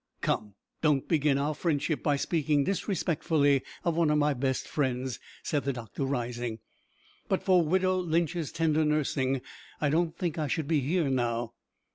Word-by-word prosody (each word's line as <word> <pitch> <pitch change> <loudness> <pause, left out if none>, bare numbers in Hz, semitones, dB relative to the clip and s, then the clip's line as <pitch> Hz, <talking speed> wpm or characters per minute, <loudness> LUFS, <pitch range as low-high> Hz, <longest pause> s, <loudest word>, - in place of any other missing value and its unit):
"Come, 105 -2 -1 0.3
don't 150 -4 +2
begin 150 -4 +2
our 145 +2 0
friendship 155 -1 -1
by 145 -2 +2
speaking 150 -1 +1
disrespectfully 160 -6 +1 0.2
of 170 -2 +1
one 165 -2 +3
of 150 - +3
my 150 0 +3
best 130 0 -1
friends," 130 -3 -1 0.2
said 145 -2 0
the 140 - -1
doctor, 120 +2 -4
rising; 120 -3 -2 0.7
"but - - +1
for 185 -2 +5
widow 185 +3 +2
Lynch's 170 -2 0
tender 160 -1 +2
nursing 135 -3 0 0.4
I 145 -2 +1
don't 165 +1 +1
think 170 -3 -2
I 155 - 0
should 155 -1 -1
be 160 -1 +3
here 155 +4 +1
now." 120 -3 -1
150 Hz, 160 wpm, -29 LUFS, 135-165 Hz, 0.7 s, for